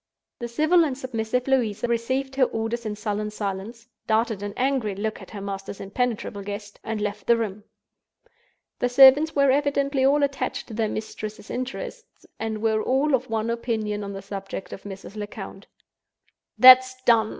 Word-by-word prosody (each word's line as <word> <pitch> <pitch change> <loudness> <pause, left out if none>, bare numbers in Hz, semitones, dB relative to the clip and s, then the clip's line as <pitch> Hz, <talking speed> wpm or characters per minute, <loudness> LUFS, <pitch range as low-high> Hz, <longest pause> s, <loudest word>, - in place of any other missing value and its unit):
The 240 - -4
civil 310 +8 +3
and 275 -5 -2
submissive 250 -1 -2
Louisa 240 -4 +1
received 260 +3 -1
her 265 -1 +4
orders 225 0 -3
in 210 - -3
sullen 210 0 -3
silence—darted 220 +2 -3
an 205 0 -5
angry 255 -6 0
look 215 +2 -3
at - - -12
her 205 - -8
master's 195 0 -6
impenetrable 210 0 -2
guest—and 205 +2 -6
left 210 0 -4
the 235 - +5
room. 210 -2 -4 1.1
The 245 - +1
servants 275 +5 +7
were 280 -2 +4
evidently 280 -1 +1
all 285 +2 +4
attached 280 -1 -2
to - - -8
their 220 0 0
mistress's 215 -1 -6
interests, 255 +1 -6
and 220 -1 -3
were 220 -1 +2
all 270 +5 +1
of 255 -1 +1
one 225 +1 -1
opinion 220 -3 -2
on 200 0 -5
the 195 -1 -7
subject 195 -1 -6
of 195 - -10
Mrs. 195 0 -9
Lecount. 205 -1 -8 0.9
"That's 255 +2 +8
done!" 225 -3 +4
225 Hz, 160 wpm, -24 LUFS, 210-255 Hz, 1.1 s, That's